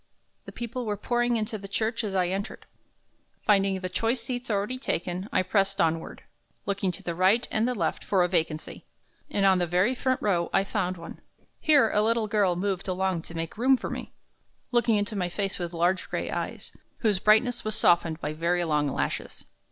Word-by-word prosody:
The - - -8
people 240 0 -5
were 205 -1 -1
pouring 240 +2 +1
into 215 0 -3
the 195 - -8
church 225 +3 -1
as 200 -3 -3
I 180 -2 +2
entered. 195 +3 -4 0.8
Finding 195 -2 +3
the 185 - -2
choice 225 +6 0
seats 245 +1 -5
already 210 +5 -1
taken, 180 -4 -3
I 185 - +2
pressed 195 +1 +1
onward, 165 0 -1 0.4
looking 195 -1 0
to - - -8
the 170 - -2
right 190 +7 +3
and 220 +2 +2
the 250 - -1
left 170 -7 -1
for 190 -3 +2
a - - +2
vacancy, 160 -3 -2 0.5
and 200 - +1
on 190 -1 +5
the 175 - 0
very 180 +8 +2
front 260 0 0
row 175 -5 +1
I 195 - +3
found 185 -3 -2
one. 165 0 -10 0.4
Here 285 -8 +4
a 210 - +3
little 225 +1 +2
girl 205 -4 +2
moved 195 +1 -2
along 185 -2 0
to 165 - -10
make 165 +5 -5
room 260 +2 +5
for - - -5
me, - - -6 0.6
looking 240 -2 +3
into 205 +1 -1
my 180 -3 -1
face 195 +2 -2
with 175 -1 -3
large 175 +2 0
gray - - -3
eyes, - - -4 0.3
whose 210 -5 +2
brightness 220 +5 +3
was 215 0 -1
softened 170 -6 +3
by 150 -1 -3
very 170 +3 0
long 150 -3 +1
lashes. 135 - -3
195 Hz, 200 wpm, -27 LUFS, 180-225 Hz, 0.8 s, on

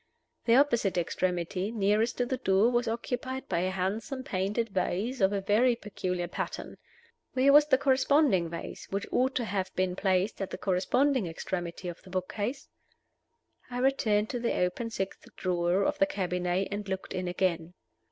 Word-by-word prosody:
The 230 - +5
opposite 235 -9 +3
extremity, 180 +2 -1
nearest 215 +1 +1
to 245 - +1
the 260 +1 -2
door, 210 -1 +3
was 240 0 +1
occupied 245 +3 -3
by 170 - 0
a 185 +2 0
handsome 205 +8 -2
painted 210 +1 -1
vase 200 +6 -1
of 190 0 +4
a 200 -1 -1
very 225 +5 +3
peculiar 185 -5 -3
pattern. - - -5 0.6
Where 270 +2 +4
was 295 0 +7
the 265 -3 +5
corresponding 265 - +3
vase, 170 0 -7
which 200 +1 -2
ought 260 +1 +1
to 245 - 0
have 195 -3 -2
been 185 -1 0
placed 190 +2 0
at 195 - -2
the - - -5
corresponding 230 +5 +1
extremity 175 +1 -4
of 175 -1 -6
the 190 - -15
book 185 0 -3
case? 245 +7 -3 1.0
I 245 - -5
returned 225 -5 +2
to 245 - -2
the 235 - 0
open 180 +6 -1
sixth 195 -4 -5
drawer 180 +1 +1
of - - 0
the 195 - +4
cabinet, 180 0 -1
and 205 0 -4
looked 190 0 -4
in 180 0 -2
again. 175 -1 -1
200 Hz, 170 wpm, -29 LUFS, 185-245 Hz, 1.0 s, was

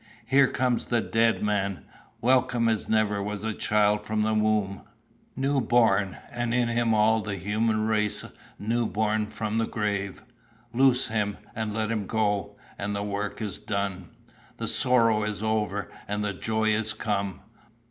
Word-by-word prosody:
Here 135 +3 +5
comes 125 -2 0
the 120 - +2
dead 115 0 +1
man, 100 -3 -1 0.4
welcome 125 -1 +3
as 110 -2 0
never 105 -2 +2
was 105 +1 -4
child 105 0 +2
from 110 0 -1
the 110 0 +1
womb 105 -3 +1 0.5
new 135 +1 +1
born, 105 -6 +2
and 120 0 -1
in 120 -1 +2
him 115 -1 +2
all 110 +1 +4
the 105 -1 -3
human 110 +3 0
race 105 -1 0 0.3
new 115 +2 0
born 110 +2 0
from 110 +1 -2
the 115 - 0
grave! 100 -3 -2 0.5
'Loose 130 0 +4
him 105 -2 -1 0.2
and 110 -1 -3
let 110 +1 -1
him 105 -4 -2
go,' 105 -2 -1 0.2
and 100 +1 -2
the 100 - -2
work 105 +1 -3
is 105 -3 -4
done. 100 -3 -3 0.5
The - - -3
sorrow 115 -4 +3
is 105 -1 -3
over, 105 -3 -1 0.2
and 105 +1 -2
the 100 - -1
joy 110 +3 0
is 110 0 +1
come. 100 -3 -2
110 Hz, 155 wpm, -26 LUFS, 105-115 Hz, 0.5 s, Here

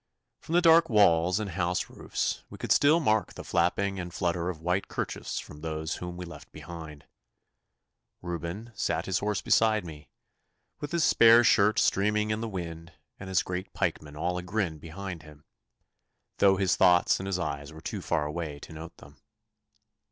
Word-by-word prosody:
From 160 - -7
the 175 - +4
dark 165 0 +6
walls 90 -4 +4
and 105 -3 -4
house 90 0 -1
roofs - - -3
we - - -10
could - - -5
still 150 +4 +5
mark 110 -8 +1
the - - -8
flapping 95 +3 0
and 90 -1 -5
flutter 85 0 -1
of 90 - -4
white 90 +4 -1
kerchiefs - - -4
from 75 - -11
those 80 0 -3
whom 90 0 -7
we 90 - -6
left 85 - -12
behind. 80 -2 -10 1.2
Reuben 85 +6 -5
sat - - -1
his 95 - 0
horse 105 0 -2
beside 110 -3 +3
me, 75 -4 -11 0.7
with 145 - -6
his 170 -2 +1
spare 115 -2 +7
shirt 105 -2 +4
streaming 105 +2 +2
in 110 +1 -2
the 115 - -3
wind 85 -3 -7 0.3
and 95 - -8
his 95 - +2
great 90 +1 -5
pikemen 75 -1 -2
all 90 +3 -1
agrin 90 -3 -2
behind 85 +2 -7
him, 75 -2 -16 0.9
though 95 -1 +5
his 95 -1 +2
thoughts 90 0 +4
and 95 - -5
his 95 -2 -1
eyes 70 -4 -4
were 80 - -11
too 80 - -5
far 75 - 0
away 75 -1 -4
to - - -10
note 80 +2 -10
them. - - -16
90 Hz, 175 wpm, -28 LUFS, 80-100 Hz, 1.2 s, spare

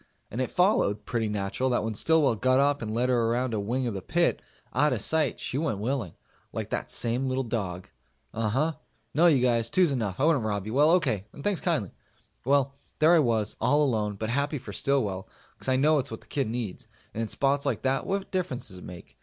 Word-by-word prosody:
And 120 - -2
it 130 - -1
followed 180 - +2
pretty 115 -3 -1
natural 105 +5 -1
that 120 - +1
when 110 0 -2
Stillwell 155 +2 +3
got 130 +4 +2
up 145 +1 +2
and 110 -2 -3
led 120 +3 0
her 120 -2 +2
around 120 +1 0
a 110 - 0
wing 120 +6 -1
of 120 - -2
the 95 - -4
pit, - - +1 0.3
out 150 +5 +3
of - - -2
sight, 155 -5 +1
she 135 - -2
went 150 -10 -1
willing 110 - -2 0.4
like - - -5
that - - -2
same 120 +3 0
little 130 +1 0
dog. 95 -6 -4 0.5
Uhuh. 130 +9 0 0.4
No, 170 +4 +5
you 140 -7 +4
guys. 115 -2 +2
Two's 180 0 +3
enough. 110 -8 -2
I - - +1
wouldn't 150 -6 +3
rob 100 -2 -2
you. 110 - -5
Well, 145 +4 +5
okay, 130 - +1
and 140 - -10
thanks 205 -4 0
kindly. 155 - 0 0.5
Well, 140 0 +2 0.2
there 160 +3 +5
I 170 - +6
was, 115 -6 +1
all 150 +1 +3
alone, 110 -6 0
but 110 +3 -3
happy 140 +3 0
for 130 - -9
Stillwell, 105 -10 0 0.3
cause - - -8
I 130 - +3
know 150 +3 +4
it's 135 - -3
what - - -7
the - - -20
kid 135 -6 -2
needs, 115 -5 -4 0.3
and 115 - -3
in 115 - -1
spots 140 +4 +1
like 120 -6 -1
that 135 0 0
what 195 0 -2
difference 175 - -2
does 95 -2 -9
it - - -12
make? 90 -1 -11
125 Hz, 230 wpm, -27 LUFS, 110-145 Hz, 0.5 s, I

